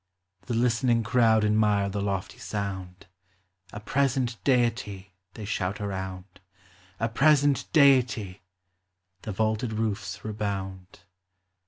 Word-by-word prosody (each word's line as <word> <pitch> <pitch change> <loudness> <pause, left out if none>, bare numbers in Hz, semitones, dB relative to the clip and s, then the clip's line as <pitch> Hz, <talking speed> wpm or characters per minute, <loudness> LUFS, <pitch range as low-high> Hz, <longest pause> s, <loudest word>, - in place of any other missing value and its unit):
The 120 - -1
listening 120 0 +2
crowd 110 -1 +3
admire 105 -1 +2
the 100 +1 -3
lofty 100 -2 -3
sound, 95 -3 -5 0.7
A 105 - -7
present 125 0 -1
deity! 115 -7 0 0.2
they 110 - -7
shout 100 -2 -2
around; 95 -2 -6 0.6
A 115 - +1
present 145 +3 +3
deity! 125 - +3 0.8
the 110 - -5
vaulted 110 +3 -1
roofs 105 -4 -3
rebound. 95 -3 -5
105 Hz, 105 wpm, -27 LUFS, 100-120 Hz, 0.8 s, crowd